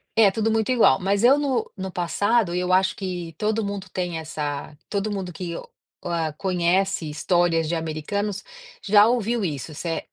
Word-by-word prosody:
É 220 Hz, -3 st, +6 dB
tudo 220 Hz, +3 st, 0 dB
muito 220 Hz, +2 st, +1 dB
igual, 230 Hz, -, +5 dB
mas 200 Hz, +3 st, 0 dB
eu 270 Hz, +4 st, +6 dB
no 275 Hz, -4 st, -1 dB
no 190 Hz, -2 st, -5 dB
passado, 190 Hz, +3 st, +1 dB
eu 180 Hz, +1 st, -1 dB
acho 190 Hz, +1 st, +3 dB
que 180 Hz, -4 st, -5 dB
todo 215 Hz, 0 st, 0 dB
mundo 200 Hz, -1 st, -4 dB
tem 175 Hz, -3 st, -3 dB
essa 150 Hz, -2 st, -5 dB
todo 205 Hz, +1 st, -2 dB
mundo 190 Hz, -3 st, -4 dB
que 170 Hz, 0 st, -5 dB
o -, -, -6 dB, 0.4 s
a 165 Hz, -2 st, -1 dB
conhece 180 Hz, 0 st, 0 dB
histórias 165 Hz, +1 st, +1 dB
de 165 Hz, -, -2 dB
americanos 170 Hz, +6 st, -3 dB, 0.4 s
já 205 Hz, +1 st, +6 dB
ouviu, 235 Hz, -1 st, 0 dB
isso, 155 Hz, -3 st, -4 dB
se 160 Hz, -, -6 dB
é 165 Hz, -, -3 dB
185 Hz, 180 wpm, -24 LUFS, 165-210 Hz, 0.4 s, É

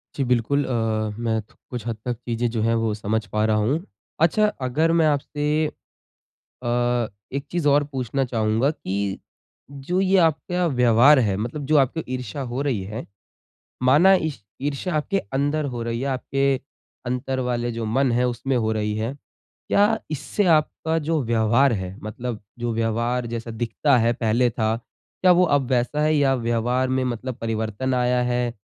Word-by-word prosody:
जी 140 Hz, -, 0 dB
बिल्कुल 125 Hz, +3 st, +1 dB
अ, -, -, -6 dB, 0.6 s
मैं 110 Hz, -1 st, +1 dB, 0.3 s
कुछ 120 Hz, -3 st, -6 dB
हद 115 Hz, -2 st, -2 dB
तक 120 Hz, -1 st, -1 dB
चीज़ें 120 Hz, 0 st, -2 dB
जो 115 Hz, -2 st, -1 dB
है 115 Hz, 0 st, +2 dB
वो 110 Hz, -2 st, 0 dB
समझ 105 Hz, +1 st, -2 dB
पा 105 Hz, 0 st, -1 dB
रहा 110 Hz, -1 st, +2 dB
हूँ। 155 Hz, +8 st, 0 dB, 0.4 s
अच्छा 210 Hz, +6 st, +4 dB, 0.2 s
अगर 160 Hz, +6 st, +2 dB
मैं 160 Hz, -, +4 dB
आपसे 145 Hz, 0 st, -1 dB, 0.2 s
अ, -, -, -15 dB, 1.4 s
एक 140 Hz, -, -3 dB
चीज़ 170 Hz, -4 st, 0 dB
और 145 Hz, +1 st, +4 dB
पूछना 135 Hz, +1 st, -1 dB
चाहूँगा 115 Hz, +2 st, +1 dB
कि 95 Hz, -10 st, -5 dB, 0.9 s
जो 180 Hz, +2 st, +1 dB
ये 195 Hz, 0 st, +3 dB
आपका 180 Hz, +3 st, -2 dB
व्यवहार 125 Hz, +4 st, +6 dB
है, 100 Hz, -5 st, +1 dB
मतलब 120 Hz, +6 st, -4 dB
जो 155 Hz, +1 st, +3 dB
आपकी 140 Hz, +4 st, +2 dB
ईर्षा 125 Hz, +2 st, -4 dB
हो 130 Hz, +3 st, -2 dB
रही 125 Hz, -10 st, -1 dB
है, -, -, -5 dB, 0.8 s
माना 155 Hz, +10 st, +6 dB
ई 160 Hz, -1 st, -1 dB, 0.3 s
ईर्षा 145 Hz, +5 st, -2 dB
आपके 195 Hz, +6 st, 0 dB
अंदर 145 Hz, +2 st, 0 dB
हो 120 Hz, -, -4 dB
रही 115 Hz, 0 st, -2 dB
है, -, -, -2 dB
आपके 135 Hz, +1 st, -2 dB, 0.6 s
अंदर 130 Hz, +1 st, -2 dB
वाले 120 Hz, 0 st, -1 dB
जो 115 Hz, -1 st, -4 dB
मन 135 Hz, -2 st, +3 dB
है 125 Hz, +1 st, +2 dB
उसमें 125 Hz, +2 st, -2 dB
हो 110 Hz, -, +1 dB
रही 105 Hz, 0 st, -1 dB
है। 115 Hz, +5 st, -2 dB, 0.6 s
क्या 200 Hz, -, +4 dB, 0.3 s
इससे 175 Hz, +7 st, -1 dB
आपका 160 Hz, +1 st, -1 dB
जो 160 Hz, -3 st, +1 dB
व्यवहार 115 Hz, +3 st, +3 dB
है, 95 Hz, +1 st, -6 dB
मतलब 115 Hz, +1 st, -5 dB, 0.2 s
जो 120 Hz, -1 st, -2 dB
व्यवहार 115 Hz, +2 st, 0 dB
जैसा 115 Hz, 0 st, -4 dB
दिखता 130 Hz, +3 st, +2 dB
है 120 Hz, -, +3 dB
पहले 120 Hz, +2 st, +3 dB
था, 110 Hz, 0 st, 0 dB, 0.5 s
क्या 180 Hz, -1 st, +7 dB
वो 180 Hz, +1 st, +5 dB
अब 135 Hz, -2 st, -2 dB
वैसा 125 Hz, +4 st, +1 dB
है 155 Hz, 0 st, +3 dB
या 135 Hz, -2 st, +3 dB
व्यवहार 120 Hz, +3 st, +1 dB
में 130 Hz, -, +1 dB
मतलब 125 Hz, +1 st, -3 dB
परिवर्तन 110 Hz, +3 st, -2 dB
आया 125 Hz, 0 st, +2 dB
है? 120 Hz, -1 st, 0 dB
125 Hz, 170 wpm, -23 LUFS, 115-145 Hz, 1.4 s, क्या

